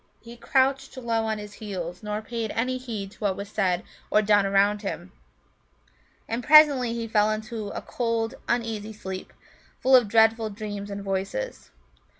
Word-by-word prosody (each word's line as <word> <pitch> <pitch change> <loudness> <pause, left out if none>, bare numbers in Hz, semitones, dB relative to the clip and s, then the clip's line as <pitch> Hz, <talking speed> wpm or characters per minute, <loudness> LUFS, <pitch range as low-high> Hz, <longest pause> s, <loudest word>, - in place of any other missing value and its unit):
He 235 0 -12
crouched 265 +2 +1
low 230 -3 -1
on 220 -1 -1
his 210 -1 -8
heels, 180 -5 -6
nor 210 0 -4
paid 230 -1 -4
any 255 +2 0
heed 215 -6 -6
to - - -19
what 200 -3 0
was 200 0 -6
said 180 -2 0 0.3
or 215 - +3
done 205 -1 +4
around 200 +1 +3
him. 185 -3 -5 1.2
And 235 +2 -3
presently 285 -6 +6
he 230 -1 -3
fell 215 -1 +3
into 215 0 -4
a - - -6
cold, 230 -2 -1
uneasy 220 -3 -2
sleep, 190 -3 -7 0.5
full 260 +1 +5
of 245 -4 +5
dreadful 225 +1 +3
dreams 205 -1 -6
and 200 0 -5
voices. 195 - -3
215 Hz, 160 wpm, -26 LUFS, 200-235 Hz, 1.2 s, presently